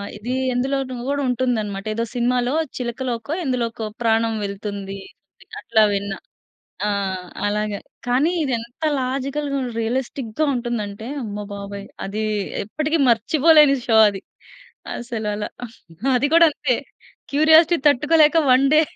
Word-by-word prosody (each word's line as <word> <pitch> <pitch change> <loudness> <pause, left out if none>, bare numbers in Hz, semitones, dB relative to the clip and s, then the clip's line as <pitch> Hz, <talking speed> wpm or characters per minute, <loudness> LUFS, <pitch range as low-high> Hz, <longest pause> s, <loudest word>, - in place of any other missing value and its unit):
ఇది 225 +5 -4 0.2
ఎందులోనో 260 +1 -1
కూడా 285 0 0
ఉంటుందన్నమాట. 220 -6 -1
ఏదో 230 - -1
సినిమాలో 245 +1 +1 0.2
చిలకలోకో, 240 0 -4
ఎందులోకో 235 -4 -2 0.2
ప్రాణం 225 0 +2
వెళ్తుంది. 200 -1 -5 0.6
అట్లా 220 +1 +2
విన్న. 200 0 -2 0.8
ఆ! - - +1 0.6
అలాగే. 210 0 -2 0.3
కానీ 265 +8 +2
ఇది 265 - -1
ఎంత 235 +6 -11 0.2
లాజికల్‌గా, 275 +2 -2 0.2
రియలిస్టిక్‌గా 245 +3 -2
ఉంటుందంటే, 230 -3 -4 0.2
అమ్మ 210 -1 -5
బాబోయ్! 200 0 -7 0.2
అది 210 +3 -3 0.4
ఎప్పటికి 305 +9 -1
మర్చిపోలేని 295 +5 +5
షో 225 - +4
అది. 195 -2 -7 0.8
అసలు 230 -3 -5
అలా. 210 0 -4 0.7
అది 255 +3 +2
కూడా 335 0 +8
అంతే 275 -3 0 0.6
క్యూరియాసిటీ 315 +3 +6
తట్టుకోలేక, 300 +3 +4
1 260 +2 +5
డే 310 - +7
245 Hz, 115 wpm, -21 LUFS, 215-275 Hz, 0.8 s, కూడా